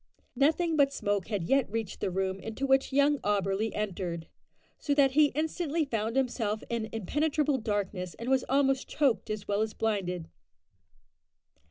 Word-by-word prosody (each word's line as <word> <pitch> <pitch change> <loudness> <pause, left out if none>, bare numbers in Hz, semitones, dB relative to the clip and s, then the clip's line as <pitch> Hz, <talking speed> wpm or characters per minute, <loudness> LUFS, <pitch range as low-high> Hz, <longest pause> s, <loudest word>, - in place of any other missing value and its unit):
Nothing 320 +5 +2
but 280 -2 +4
smoke 205 -7 -1
had 205 -5 -2
yet 270 +9 +2
reached 225 -3 -3
the - - -1
room 190 +1 -1
into 225 +6 -4
which 270 0 +3
young 285 +1 +3
Auberly 200 +1 0
entered, 180 -5 -3 0.5
so 285 - 0
that 275 -2 +5
he 295 +2 +5
instantly 320 0 -1
found 225 -3 -2
himself 230 -5 0
in 225 -2 -2
impenetrable 290 - 0
darkness, 200 -4 -3
and 230 - -7
was 265 -1 +3
almost 270 0 +2
choked 265 -10 +1
as 215 -1 -4
well 205 +1 +1
as 220 0 -2
blinded. 180 -6 -1
225 Hz, 155 wpm, -29 LUFS, 205-280 Hz, 0.5 s, that